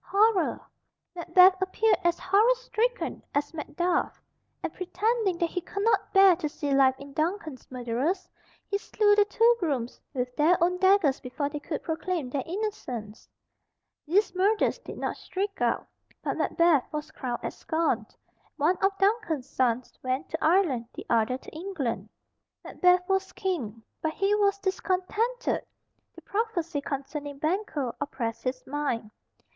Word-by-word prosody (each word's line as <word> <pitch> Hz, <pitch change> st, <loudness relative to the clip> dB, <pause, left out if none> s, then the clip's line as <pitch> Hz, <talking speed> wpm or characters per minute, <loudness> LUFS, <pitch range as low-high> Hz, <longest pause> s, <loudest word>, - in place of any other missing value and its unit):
horror!" 400 Hz, -1 st, +3 dB, 0.6 s
Macbeth 365 Hz, +2 st, +5 dB
appeared 425 Hz, +4 st, +2 dB
as 345 Hz, 0 st, +2 dB
horror 420 Hz, +7 st, +4 dB
stricken -, -, -2 dB
as 290 Hz, +2 st, 0 dB
Macduff, 345 Hz, +3 st, -1 dB, 0.4 s
and -, -, -3 dB
pretending 405 Hz, +1 st, 0 dB
that 340 Hz, -1 st, 0 dB
he 360 Hz, -, -2 dB
could 400 Hz, +3 st, -4 dB
not 435 Hz, -3 st, +2 dB
bear 385 Hz, -2 st, +7 dB
to 310 Hz, -4 st, -2 dB
see 290 Hz, -1 st, -2 dB
life 265 Hz, -1 st, +5 dB
in 280 Hz, 0 st, -11 dB
Duncan's 315 Hz, -3 st, -3 dB
murderers, 255 Hz, +9 st, -2 dB, 0.4 s
he 400 Hz, -1 st, -1 dB
slew 415 Hz, 0 st, +3 dB
the 410 Hz, 0 st, +5 dB
two 460 Hz, +3 st, +4 dB
grooms 270 Hz, -9 st, -2 dB
with 250 Hz, -1 st, -3 dB
their 330 Hz, +4 st, +4 dB
own 360 Hz, +1 st, +2 dB
daggers 375 Hz, -8 st, +4 dB
before 280 Hz, +3 st, -3 dB
they 295 Hz, 0 st, -5 dB
could 295 Hz, +1 st, -5 dB
proclaim 320 Hz, -4 st, -2 dB
their 275 Hz, -, -1 dB
innocence. 325 Hz, -, -5 dB, 0.8 s
These 385 Hz, +5 st, +2 dB
murders 400 Hz, +4 st, +2 dB
did -, -, -9 dB
not -, -, -3 dB
shriek 395 Hz, +2 st, -4 dB
out, -, -, +1 dB, 0.4 s
and -, -, -2 dB
Macbeth 335 Hz, -6 st, +3 dB
was 300 Hz, 0 st, -5 dB
crowned 245 Hz, -4 st, -4 dB
at -, -, -3 dB
Scone. 315 Hz, -9 st, -1 dB, 0.5 s
One 325 Hz, +5 st, +2 dB
of 390 Hz, 0 st, +1 dB
Duncan's 390 Hz, -, +1 dB
sons 250 Hz, -3 st, -1 dB
went 255 Hz, +1 st, -2 dB
to 320 Hz, -, -4 dB
Ireland, 310 Hz, -9 st, +3 dB
the -, -, -7 dB
other 230 Hz, +2 st, +2 dB
to -, -, -13 dB
England. 320 Hz, -8 st, -4 dB, 0.5 s
Macbeth 360 Hz, 0 st, +3 dB
was 385 Hz, 0 st, 0 dB
King. 245 Hz, -, -3 dB, 0.2 s
But 315 Hz, 0 st, -1 dB
he 395 Hz, +1 st, +2 dB
was 405 Hz, -1 st, +3 dB
discontented. 395 Hz, +5 st, -1 dB, 0.5 s
The -, -, -12 dB
prophecy 375 Hz, -8 st, -2 dB
concerning 280 Hz, +1 st, -5 dB
Banquo 310 Hz, -, -1 dB
oppressed 235 Hz, -5 st, -3 dB
his 255 Hz, 0 st, -3 dB
mind. 265 Hz, -7 st, -2 dB
340 Hz, 150 wpm, -27 LUFS, 275-390 Hz, 0.8 s, bear